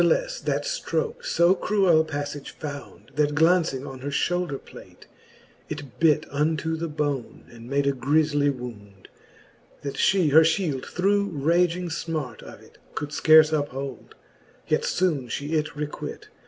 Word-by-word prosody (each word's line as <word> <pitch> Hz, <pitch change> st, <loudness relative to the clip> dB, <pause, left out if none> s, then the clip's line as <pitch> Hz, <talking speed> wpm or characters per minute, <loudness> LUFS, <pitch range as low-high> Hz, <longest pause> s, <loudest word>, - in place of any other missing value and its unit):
Nath'lefTe -, -, +1 dB
that -, -, 0 dB
ftroke -, -, -2 dB
fo 180 Hz, -, +4 dB
cruell 190 Hz, -5 st, +3 dB
paflage 145 Hz, -2 st, -5 dB
found, 145 Hz, -2 st, -8 dB
That 150 Hz, 0 st, +1 dB
glauncing 160 Hz, -4 st, +3 dB
on 135 Hz, -1 st, -8 dB
her 140 Hz, +2 st, -4 dB
Ihoulder 175 Hz, 0 st, 0 dB
plate, -, -, -14 dB, 0.6 s
it 145 Hz, -4 st, -8 dB
bit 160 Hz, -3 st, +4 dB
Unto 155 Hz, +3 st, 0 dB
the 165 Hz, +1 st, -3 dB
bone, 145 Hz, -5 st, -3 dB
and 115 Hz, 0 st, -12 dB
made 140 Hz, 0 st, +1 dB
a 140 Hz, -, +3 dB
griefly 145 Hz, +2 st, +2 dB
wound, 105 Hz, -7 st, -8 dB, 0.7 s
That 140 Hz, -1 st, -5 dB
fhe 185 Hz, -6 st, +3 dB
her 160 Hz, +3 st, +8 dB
Ihield 160 Hz, -5 st, +1 dB
through 200 Hz, +2 st, +1 dB
raging 170 Hz, +3 st, +1 dB, 0.2 s
{mart 150 Hz, -7 st, -4 dB
of -, -, -12 dB
it -, -, -20 dB, 0.2 s
Could 145 Hz, -, -3 dB
fcarfe 155 Hz, +1 st, +6 dB
uphold 140 Hz, -3 st, -5 dB, 0.5 s
j -, -, +3 dB
yet -, -, -2 dB
fbone 165 Hz, -8 st, 0 dB
fhe 140 Hz, +5 st, -5 dB
it 155 Hz, -1 st, +1 dB
requit. 150 Hz, 0 st, -6 dB
150 Hz, 150 wpm, -25 LUFS, 140-170 Hz, 0.7 s, her